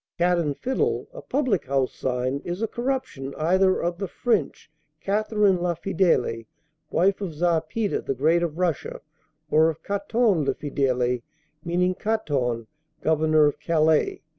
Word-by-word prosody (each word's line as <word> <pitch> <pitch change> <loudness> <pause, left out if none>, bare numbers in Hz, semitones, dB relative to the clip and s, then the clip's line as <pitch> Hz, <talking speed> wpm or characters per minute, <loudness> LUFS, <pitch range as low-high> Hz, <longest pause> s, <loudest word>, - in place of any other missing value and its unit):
"'Cat 175 0 +3
and 150 -4 -1
Fiddle,' 435 - -1
a - - -8
public 255 - 0
house 135 -1 0
sign, 130 +1 -2
is 175 +5 -4
a - - +1
corruption 240 - -3
either 185 +4 +3
of 175 +1 -2
the 195 - -2
French 195 - -1 0.3
Catherine 205 -2 +1
la 175 -1 0
fidèle, 160 - 0 0.4
wife 195 +4 +2
of 175 -6 -4
Czar 165 0 +2
Peter 205 +6 -2
the 135 - -3
Great 160 +6 +3
of 165 -2 -2
Russia, 175 -6 -2 0.5
or 160 +1 +5
of 160 - -6
Caton 200 -2 +1
le - - 0
fidèle, 125 -4 0 0.4
meaning 180 +2 +1
Caton, 140 - -1 0.4
governor 155 -1 +3
of 145 - 0
Calais." 160 -2 +2
170 Hz, 145 wpm, -24 LUFS, 145-200 Hz, 0.5 s, or